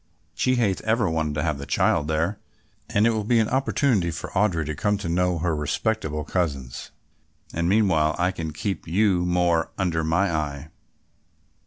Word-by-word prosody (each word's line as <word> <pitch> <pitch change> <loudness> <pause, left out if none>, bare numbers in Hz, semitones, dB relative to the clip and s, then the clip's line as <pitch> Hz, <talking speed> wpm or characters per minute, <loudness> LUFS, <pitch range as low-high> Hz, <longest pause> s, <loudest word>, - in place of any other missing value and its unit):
She 130 - +1
hath 105 -6 +1
ever 110 -1 +1
wanted 80 -2 -1
to 75 - -1
have 75 -4 -1
the 70 - -7
child 75 - +2
there 80 +6 -1 0.5
and 105 +2 +2
it 115 - +4
will 110 -2 -1
be 115 +3 +2
an 110 -1 +3
opportunity 130 -7 +1
for 80 - -6
Audry 95 -5 +1
to 80 - -3
come 105 +7 0
to 100 - -5
know 90 +1 +1
her 85 0 0
respectable 75 +1 -1
cousins, 70 -8 -3 0.6
and 85 +1 0
meanwhile 95 -7 +3
I 90 +1 +1
can 80 -4 -5
keep 85 +2 -4
you 95 +1 +2
more 90 -2 +2
under 85 -4 0
my 85 +4 +1
eye." 75 -1 -3
85 Hz, 175 wpm, -24 LUFS, 80-100 Hz, 0.6 s, it